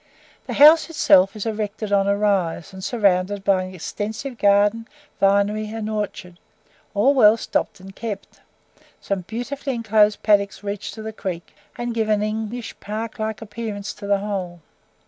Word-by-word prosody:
The - - -3
house 310 +4 +7
itself 195 - +4
is 215 - -5
erected 215 -1 -3
on 200 -1 +3
a 200 0 +2
rise 195 -4 0
and 190 0 -9
surrounded 200 -3 +1
by 190 -2 +2
an 185 0 -9
extensive 220 - -5
garden, 205 +3 +3 0.3
vinery 200 +2 +2
and 220 -1 -4
orchard, 205 -4 -5 0.6
all 250 +8 +4
well 225 -5 +6
stocked 220 - -2
and 190 +1 -12
kept; 210 -4 -7 0.6
some 200 -2 -3
beautifully 245 +7 -4
enclosed 215 -2 +2
paddocks 205 -1 +2
reach 205 0 -4
to 220 - -8
the 220 0 -6
Creek, 180 -5 -6 0.2
and 240 0 -3
give 220 -1 -1
an 210 -1 +2
English 220 +2 -4
park 220 +2 -5
like 220 0 -3
appearance 210 -2 -5
to 205 -1 -9
the 200 0 +3
whole. 190 -4 -4
210 Hz, 160 wpm, -22 LUFS, 200-220 Hz, 0.6 s, house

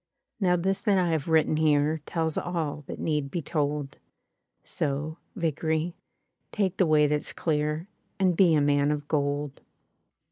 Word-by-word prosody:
''Now 180 -2 +3
this 190 +2 0
that 205 -4 +2
I 180 -2 +2
have 160 -3 -1
written 160 -1 +3
here 155 0 +2
Tells 160 -2 -1
all 160 -4 -3
that - - -6
need 150 -3 -1
be 165 +3 -3
told; 145 -2 -2 0.6
So, 150 +3 -3 0.2
Vickery, 160 -1 -1 0.6
take 195 -4 -1
the 185 - +3
way 155 -1 +5
that's 150 0 -1
clear. 150 +1 -1 0.3
And 185 -2 +3
be 170 -3 +5
a 150 - +3
man 145 0 +3
of 150 -1 -2
gold." 145 -1 -1
155 Hz, 150 wpm, -27 LUFS, 145-170 Hz, 0.6 s, way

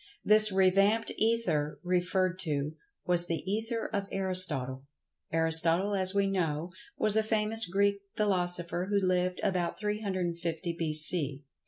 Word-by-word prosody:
This 215 0 +5
revamped 195 +4 +2
Ether, 185 -10 -1
referred 180 0 -1
to, 150 -4 -2 0.3
was 175 -1 +1
the 165 -1 -4
"Ether 225 +4 -3
of 200 -1 -3
Aristotle." 155 -9 +1 0.5
Aristotle, 165 +4 +4
as 190 -1 +2
we 200 0 +2
know, 170 -4 -3 0.3
was 215 -1 +3
a 220 - +3
famous 220 -1 +2
Greek 200 +2 0
philosopher 180 -3 -1
who 205 - 0
lived 185 -1 -1
about 180 -4 -2
350 180 -5 -4
b.c. 155 -3 +1
185 Hz, 125 wpm, -28 LUFS, 170-200 Hz, 0.5 s, This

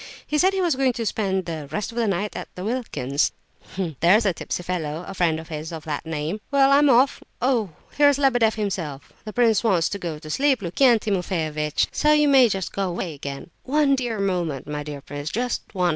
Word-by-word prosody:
He 300 - 0
said 375 +4 +4
he 385 - 0
was 340 -6 +2
going 260 -1 +2
to 230 -1 -3
spend 190 -4 -1
'the 160 -4 -5
rest 210 +1 -3
of - - -13
the 235 -2 +1
night' 200 +1 -1
at - - -5
Wilkin's; 180 - -1 0.7
there's 200 +7 +4
a 195 - +2
tipsy 175 - -4
fellow, 170 -2 -3
a 195 - -6
friend 170 -4 +1
of 160 - -11
his, 155 0 -5
of 160 -2 -7
that 155 +1 -4
name. 160 +6 -3
Well, 275 -1 +4
I'm 285 +1 +5
off. 260 +2 +4 0.2
Oh, 245 -6 +1 0.3
here's 285 -1 +5
Lebedeff 245 -6 +3
himself! 180 -10 -4
The 215 - -6
prince 230 -3 +3
wants 185 -7 +2
to 200 - -4
go 170 -4 -4
to 155 0 -11
sleep, 270 - +2
Lukian 235 +8 +4
Timofeyovitch, 160 -7 -1
so 300 0 +3
you 300 -1 +4
may 265 -4 +6
just 190 -3 -3
go 195 -2 -1
away 175 -1 -4
again." 140 +2 -7
"One 280 0 +2 0.3
moment, 170 -8 -2
my 150 0 -4
dear 145 -1 -7
prince, 145 +2 -6
just 245 +5 -2
one. 180 -3 +1
195 Hz, 205 wpm, -23 LUFS, 160-245 Hz, 0.7 s, may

